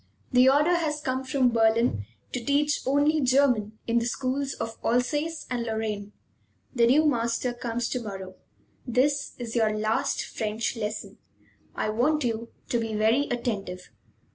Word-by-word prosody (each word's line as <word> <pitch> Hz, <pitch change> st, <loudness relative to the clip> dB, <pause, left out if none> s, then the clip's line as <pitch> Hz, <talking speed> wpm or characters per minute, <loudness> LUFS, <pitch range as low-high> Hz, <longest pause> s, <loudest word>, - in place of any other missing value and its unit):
The 250 Hz, +1 st, +6 dB
order 300 Hz, +6 st, +4 dB
has 305 Hz, -3 st, -1 dB
come 260 Hz, -2 st, -2 dB
from 260 Hz, -1 st, +2 dB
Berlin 225 Hz, -, +2 dB, 0.3 s
to 250 Hz, -, -3 dB
teach 290 Hz, +3 st, +1 dB
only 290 Hz, +3 st, +3 dB
German 250 Hz, -5 st, +2 dB
in 235 Hz, 0 st, +2 dB
the 230 Hz, -, -1 dB
schools 265 Hz, +3 st, -2 dB
of 225 Hz, 0 st, -5 dB
Alsace 295 Hz, +7 st, 0 dB
and 245 Hz, -1 st, -2 dB
Lorraine. 220 Hz, -2 st, -3 dB, 0.6 s
The 235 Hz, -3 st, +4 dB
new 295 Hz, +6 st, +5 dB
master 235 Hz, -2 st, +1 dB
comes 240 Hz, -1 st, -3 dB
to 250 Hz, -, -2 dB
morrow. 195 Hz, -4 st, -7 dB, 0.5 s
This 275 Hz, +4 st, +1 dB
is 235 Hz, -2 st, -6 dB
your 215 Hz, -2 st, +2 dB
last 215 Hz, +1 st, 0 dB
French 220 Hz, +2 st, -2 dB
lesson. 210 Hz, -1 st, -5 dB, 0.6 s
I -, -, -1 dB
want 275 Hz, +8 st, +1 dB
you 230 Hz, -1 st, -2 dB, 0.2 s
to 240 Hz, -, +1 dB
be 225 Hz, -1 st, -3 dB
very 225 Hz, +7 st, +3 dB
attentive." 200 Hz, -7 st, -3 dB
240 Hz, 150 wpm, -26 LUFS, 220-275 Hz, 0.6 s, The